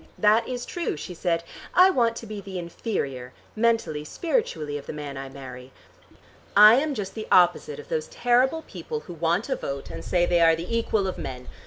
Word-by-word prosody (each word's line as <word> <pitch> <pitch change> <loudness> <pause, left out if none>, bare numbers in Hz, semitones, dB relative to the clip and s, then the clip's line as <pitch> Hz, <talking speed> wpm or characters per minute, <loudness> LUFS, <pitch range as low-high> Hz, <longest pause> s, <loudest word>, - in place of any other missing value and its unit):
"That 215 +2 +4
is 245 -1 -4
true," 340 - -3
she 180 - -7
said. 170 -1 -1 0.3
"I 370 +1 +7
want 235 -7 +2
to 230 - -7
be 210 -2 -6
the 195 -1 -7
inferior, 140 - -4 0.2
mentally, 225 -10 +1
spiritually, 155 - -2
of 140 - -14
the - - -5
man 145 -2 -6
I 135 0 -6
marry. 130 -1 -10 0.9
I 210 +1 +10
am 290 +1 0
just 195 -4 -4
the 220 -1 -6
opposite 175 -5 +4
of 145 - -11
those 155 0 -2
terrible 255 +6 +2
people 165 - -6
who 175 - -10
want 170 +5 0
a 265 - 0
vote, 140 - -5
and 80 0 -7
say 175 - +2
they 175 -1 +2
are 165 -1 +6
the 175 +8 -4
equal 220 -3 +1
of 190 - -3
men. 125 -1 -6
175 Hz, 200 wpm, -25 LUFS, 150-230 Hz, 0.9 s, I